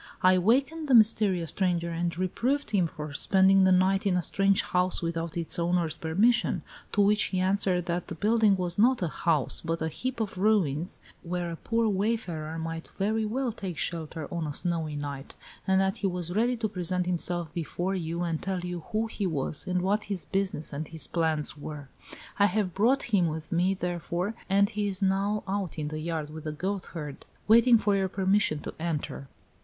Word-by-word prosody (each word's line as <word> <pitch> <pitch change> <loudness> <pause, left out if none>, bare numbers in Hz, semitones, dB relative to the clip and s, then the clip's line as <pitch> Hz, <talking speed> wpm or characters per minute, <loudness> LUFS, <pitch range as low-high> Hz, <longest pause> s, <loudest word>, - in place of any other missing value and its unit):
I 185 0 +6
wakened 275 - +1
the 265 - +5
mysterious 210 -6 +4
stranger 175 -3 0
and 170 0 -2
reproved 245 +10 -1
him 190 -5 +2
for 150 -2 -7
spending 190 +3 +4
the 190 - +5
night 190 +2 +3
in 180 -2 +2
a 180 - 0
strange 195 +2 +2
house 180 0 0
without 165 -1 -3
its 170 0 +1
owner's 170 -1 +1
permission, 205 +10 +2 0.3
to 205 - +3
which 210 +1 +4
he 185 - -2
answered 185 -1 +1
that 175 0 -2
the 165 - -6
building 210 +2 +3
was 180 0 -3
not 245 -1 +4
a - - +1
house, 155 -4 0
but 165 0 -2
a 160 - -1
heap 255 - -4
of 205 -4 -3
ruins, 185 -5 +1 0.2
where 175 0 -3
a - - -4
poor 230 +6 0
wayfarer 190 -7 -1
might 165 0 -5
very 215 +3 0
well 250 +3 -1
take 190 -6 -6
shelter 160 -1 -3
on 170 -2 -2
a 145 - -4
snowy 165 -2 -2
night, 145 -1 -6 0.3
and 190 0 +4
that 195 0 +1
he 200 - 0
was 175 -1 -3
ready 240 +3 +2
to 225 -1 -1
present 180 -2 -2
himself 175 -2 0
before 175 +2 -2
you 170 -1 -2
and 165 -2 -2
tell 190 -1 -2
you 180 0 -4
who 220 +1 +1
he 210 -3 -3
was 150 -2 -3
and 180 -1 0
what 205 +3 +1
his 200 -3 -3
business 195 -6 -2
and 150 +2 -4
his 160 -1 -4
plans 160 -3 0
were. 145 -1 -8 0.5
I 200 - +6
have 200 -2 -1
brought 250 +7 +3
him 180 -4 +4
with 155 -1 -5
me, 180 +3 +2
therefore, 175 +2 -2 0.2
and 200 +1 +4
he 210 -1 -2
is 195 0 -2
now 200 +2 +1
out 195 -3 -2
in 150 -1 -2
the 155 0 -4
yard 155 -2 -3
with 155 0 -9
the 155 - -2
goatherd, 165 -3 -5 0.2
waiting 230 +2 +7
for 205 -2 +1
your 190 -1 0
permission 190 -5 +1
to - - -6
enter." 155 -4 -3
180 Hz, 195 wpm, -28 LUFS, 165-205 Hz, 0.5 s, waiting